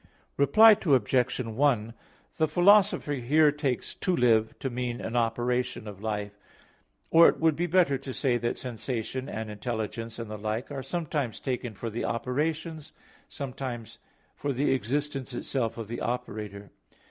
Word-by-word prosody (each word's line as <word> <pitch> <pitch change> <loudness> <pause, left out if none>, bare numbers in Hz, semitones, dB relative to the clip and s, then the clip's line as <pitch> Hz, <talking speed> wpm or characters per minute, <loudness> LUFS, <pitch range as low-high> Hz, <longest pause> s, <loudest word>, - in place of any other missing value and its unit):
Reply 215 +10 +7
Obj. 130 - +2
1: 115 -1 +1 0.4
The 160 - +3
Philosopher 185 -1 +4
here 145 +4 +3
takes 140 -4 -2
"to 185 -2 -1
live" 110 -4 +3
to 135 - -4
mean 120 0 -3
an 115 - -5
operation 120 0 0
of 100 -2 -9
life. 105 -1 -4 0.7
Or 165 +1 +8
it - - -3
would 160 -2 +3
be 175 +3 -1
better 170 -6 +3
to 135 0 -7
say 130 -2 +1
that 120 +1 -2
sensation 125 +2 -4
and 110 -1 -5
intelligence 115 +1 -4
and 115 -2 -6
the 105 - -6
like, 110 +6 -3
are 140 -2 -4
sometimes 145 - -3
taken 125 -4 -3
for 115 +3 -5
the 115 - -3
operations, 155 +6 -2 0.4
sometimes 130 -5 -6 0.4
for 145 - -2
the 140 +2 +1
existence 135 +1 -2
itself 120 -3 -2
of 115 -2 -5
the 120 +2 -5
operator. 105 -4 -4
125 Hz, 150 wpm, -28 LUFS, 115-145 Hz, 0.7 s, Or